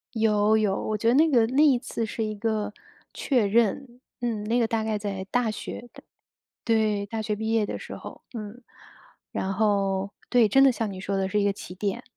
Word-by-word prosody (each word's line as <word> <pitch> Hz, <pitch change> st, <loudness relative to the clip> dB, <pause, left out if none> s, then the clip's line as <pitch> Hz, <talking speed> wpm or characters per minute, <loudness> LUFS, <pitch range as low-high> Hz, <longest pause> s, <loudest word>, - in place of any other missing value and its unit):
有 215 Hz, -1 st, +3 dB
有， 210 Hz, -3 st, +2 dB
我 215 Hz, -, 0 dB
觉 225 Hz, -, -3 dB
得 240 Hz, -, +4 dB
那 315 Hz, +3 st, +5 dB
个 235 Hz, -6 st, +4 dB
那 275 Hz, +4 st, +3 dB
一 270 Hz, -5 st, +5 dB
次 230 Hz, -3 st, -4 dB
是 220 Hz, +1 st, -3 dB
一 215 Hz, 0 st, -3 dB
个 215 Hz, 0 st, -2 dB, 0.4 s
确 250 Hz, -6 st, +1 dB
认， 235 Hz, +4 st, 0 dB, 0.2 s
嗯， 230 Hz, -4 st, -2 dB
那 230 Hz, +3 st, +1 dB
个 235 Hz, -, +3 dB
大 225 Hz, -1 st, -1 dB
概 220 Hz, -1 st, -1 dB
在 200 Hz, -2 st, -4 dB
大 245 Hz, -2 st, +1 dB
学 235 Hz, +3 st, -7 dB
的， -, -, -14 dB, 0.6 s
对， 215 Hz, -3 st, +1 dB
大 220 Hz, +2 st, -4 dB
学 210 Hz, -1 st, -2 dB
毕 220 Hz, +1 st, -3 dB
业 220 Hz, -2 st, +2 dB
的 -, -, -5 dB
时 -, -, -8 dB
候。 -, -, -10 dB
嗯， 220 Hz, +1 st, -7 dB, 0.7 s
然 195 Hz, +1 st, -2 dB
后 195 Hz, -2 st, +1 dB, 0.2 s
对， 235 Hz, -3 st, +4 dB
真 270 Hz, +6 st, +6 dB
的 270 Hz, -, +7 dB
像 225 Hz, -3 st, -3 dB
你 190 Hz, -, -7 dB
说 195 Hz, +1 st, -3 dB
的 190 Hz, 0 st, 0 dB
是 210 Hz, -, +1 dB
一 200 Hz, -, +1 dB
个 200 Hz, -, +2 dB
起 180 Hz, -, -9 dB
点。 205 Hz, +5 st, -3 dB
220 Hz, 230 characters per minute, -26 LUFS, 205-235 Hz, 0.7 s, 的